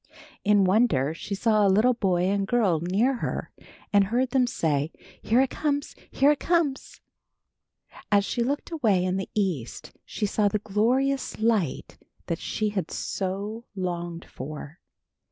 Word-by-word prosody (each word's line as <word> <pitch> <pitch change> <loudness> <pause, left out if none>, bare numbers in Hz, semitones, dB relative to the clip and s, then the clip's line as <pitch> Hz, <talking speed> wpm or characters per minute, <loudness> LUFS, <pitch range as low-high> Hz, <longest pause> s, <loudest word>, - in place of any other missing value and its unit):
In 205 -1 +4
wonder, 185 - +2
she 200 +4 -5
saw 215 +1 +2
a 200 - +4
little 215 +6 +4
boy 185 -6 +1
and 195 +1 +1
girl 210 -9 +2
near 215 +10 +1
her - - -4 0.4
and 200 -1 +5
heard 245 +5 0
them 255 -1 +3
say, 155 -8 0 0.3
"Here 235 +4 +3
it 265 - 0
comes! 285 -2 -2
Here 280 +2 +4
it 295 - 0
comes!" 335 -6 -1 1.1
As 200 -1 +4
she 240 - -2
looked 280 +7 -2
away 215 - +2
in 185 +1 0
the 195 - -4
east 180 - -2
she 215 - -3
saw 205 +1 +1
the 205 - +1
glorious 245 +7 0
light 215 - 0 0.3
that 165 - -3
she 215 -1 -2
had 200 -3 -3
so 200 +4 -4
longed 175 -2 -4
for. 150 +4 -8
205 Hz, 155 wpm, -26 LUFS, 185-245 Hz, 1.1 s, and